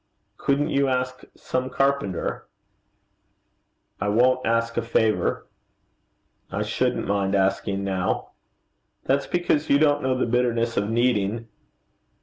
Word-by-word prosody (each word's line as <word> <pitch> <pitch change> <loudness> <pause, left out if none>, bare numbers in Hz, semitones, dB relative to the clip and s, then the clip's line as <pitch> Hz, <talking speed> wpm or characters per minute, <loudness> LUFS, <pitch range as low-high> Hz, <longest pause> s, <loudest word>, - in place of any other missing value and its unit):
'Couldn't 140 +1 +1
you 140 0 +2
ask 130 0 -2
some 130 0 -3
carpenter?' 135 -8 -1 1.5
'I 100 - 0
won't 125 +4 +3
ask 115 0 +1
a - - +1
favour.' 110 -2 0 1.1
'I - - -1
shouldn't - - -1
mind 100 0 0
asking, 100 0 0
now.' 95 -1 -2 0.7
'That's 140 +1 +1
because 165 -3 0
you 140 - +6
don't 145 -1 +3
know 130 0 0
the - - +1
bitterness 120 -1 0
of 100 +1 0
needing.' 115 -2 +1
120 Hz, 120 wpm, -24 LUFS, 105-130 Hz, 1.5 s, you